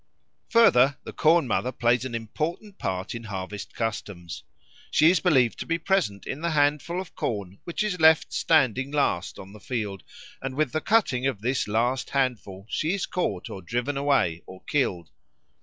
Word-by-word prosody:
Further, 140 - +5
the - - -8
Corn 165 0 +4
mother 125 +2 0
plays 120 0 +1
an 125 -3 -4
important 160 - -4
part 95 0 -3
in 115 -1 -7
harvest 100 0 -6
customs. 100 -6 -4 0.5
She 155 +3 +5
is 180 - +2
believed 135 -10 +3
to - - -5
be 165 - +1
present 170 - 0
in 140 - -5
the 170 - 0
handful 150 +3 +1
of 185 -2 -7
corn 100 -4 -4
which 170 +4 -2
is 200 -4 -2
left 160 -1 +5
standing 135 -4 +2
last 140 -11 0
on 95 +1 -11
the 105 - -12
field; 105 -4 -4 0.4
and 135 -1 -4
with 150 -3 +1
the 155 - -1
cutting 140 - +2
of 125 -7 -3
this 125 +1 0
last 120 +5 0
handful 120 -8 -2
she 160 - -1
is 195 - -2
caught, 105 - -2
or 95 - -7
driven 120 +9 -2
away, 135 - +1
or 95 0 -12
killed. 95 - -1
130 Hz, 175 wpm, -26 LUFS, 105-155 Hz, 0.5 s, Further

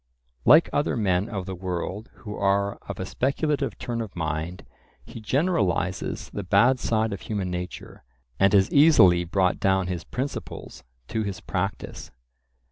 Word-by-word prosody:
Like 155 +7 +7
other 145 - +1
men 95 -1 +1
of 95 -5 -4
the 95 - -5
world 95 +3 -4
who 105 -4 -8
are 100 0 +1
of - - -5
a - - -3
speculative 145 +3 -1
turn 120 -1 -3
of 110 -4 -7
mind, 80 +1 -3 0.4
he 115 - -10
generalizes 130 - -1
the 100 - -3
bad 105 +7 +3
side 110 -3 0
of 100 - -6
human 100 -4 -3
nature, 90 -6 -7 0.4
and 95 - +5
has 95 -2 +4
easily 95 - +6
brought 90 +1 +1
down 95 -1 +2
his 90 -2 -4
principles 130 - -6 0.3
to 110 - -1
his 100 -3 -4
practice. 95 +2 -4
100 Hz, 150 wpm, -25 LUFS, 90-115 Hz, 0.4 s, Like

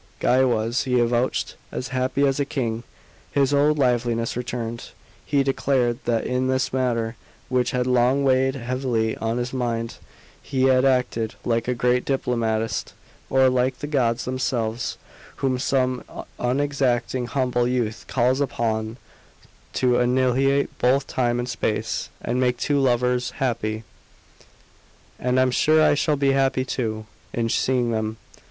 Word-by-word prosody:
Guy 130 +1 +3
was, 120 0 +1
he 125 -1 0
avouched, 120 +1 0 0.2
"as 130 - -4
happy 130 +2 +1
as 135 0 +1
a - - +3
king." 120 -5 -2 0.5
His 140 0 +2
old 150 +2 +3
liveliness 120 -3 +1
returned; 120 -1 -4 0.4
he 140 -1 +2
declared 130 -3 +1
that 115 -2 0
in 125 +1 0
this 130 0 0
matter, 120 -3 0 0.3
which 125 -1 +1
had 125 -1 0
long 125 +2 +3
weighed 130 0 +3
heavily 120 -3 -1
on 115 +1 -2
his 125 +1 -3
mind, 115 -2 -2 0.4
he 130 -2 -1
had 130 0 +4
acted 125 -4 +1
like 115 -1 0
a 125 - 0
great 125 +1 +2
diplomatist, 115 -4 -1 0.4
or 130 0 +4
like 130 0 +1
the - - -5
gods 125 -6 0
themselves, 125 -3 -2 0.4
whom 130 -2 -1
some 130 -1 0 0.4
unexacting, 125 -2 0
humble 125 -2 0
youth 120 -3 -2
calls 130 +2 +1
upon 110 -4 -1 0.8
to 125 -1 +2
"Annihilate 130 +3 +2
both 135 +3 +3
time 120 -3 0
and 120 0 -2
space, - - -2
And 125 +2 -1
make 125 -1 +2
two 145 +3 +1
lovers 125 -1 +1
happy!" 110 -4 -1 1.4
"And 125 +1 +1
I'm 130 0 +3
sure 155 +5 +3
I - - +5
shall 150 +1 +1
be 140 -1 +2
happy 135 -1 +1
too, 110 -4 -3 0.3
in 115 -1 -1
seeing 125 0 +1
them. 110 0 -2
125 Hz, 145 wpm, -23 LUFS, 120-130 Hz, 1.4 s, I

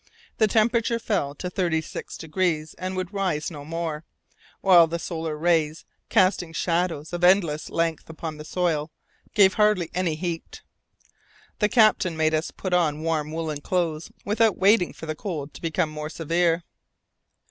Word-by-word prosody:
The 220 - +5
temperature 230 +2 +2
fell 195 -11 -1
to 180 - -5
36 170 -3 -2
degrees 160 -1 -1
and 185 +1 -3
would 185 +1 -4
rise 185 -6 -1
no 145 -3 -8
more, 160 0 -4 0.6
while 175 -4 +7
the 170 +1 -3
solar 160 -2 -4
rays, 165 -1 +1 0.2
casting 185 -3 +2
shadows 170 -2 -1
of 175 0 -3
endless 175 -5 +3
length 165 -1 -1
upon 160 -1 -6
the 150 - -8
soil, 160 -2 -1 0.5
gave 195 -2 +6
hardly 210 -6 +2
any 175 -3 0
heat. 170 0 -5 1.0
The 210 - +3
captain 215 -8 +4
made 155 0 +2
us 155 +1 0
put 185 -2 -5
on 155 -3 +1
warm 155 -2 -1
woollen 160 -2 -3
clothes 165 -2 -1
without 215 +1 +2
waiting 195 -1 +4
for - - -10
the 155 - -2
cold 155 -4 -5
to - - -12
become 165 -1 0
more 150 0 -5
severe. 165 +1 0
165 Hz, 155 wpm, -25 LUFS, 155-185 Hz, 1.0 s, while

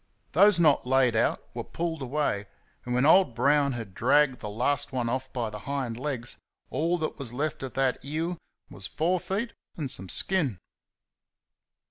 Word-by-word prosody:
Those 200 +2 +6
not 150 -6 +4
laid 130 -2 +3
out 110 - +1
were - - -4
pulled 165 -2 -4
away, 130 -7 -1 0.4
and 125 0 -1
when 125 +2 +3
old 160 -6 +5
Brown 140 +2 +3
had 115 -5 -6
dragged 135 +4 +3
the 105 - -5
last 140 +7 0
one 125 -3 -1
off 130 +2 -3
by 115 -4 -2
the 105 - -7
hind 135 -5 -2
legs, 125 -2 -4 0.3
all 170 +3 +1
that 155 -2 -3
was 125 -4 -2
left 150 +3 -2
of 135 -2 -6
that 135 -1 +1
ewe 160 +5 -3 0.3
was 95 -1 -5
four 170 - 0
feet 210 +7 -3 0.2
and 145 -6 -2
some 95 -4 -5
skin. 155 - +1
135 Hz, 170 wpm, -27 LUFS, 120-155 Hz, 0.4 s, Those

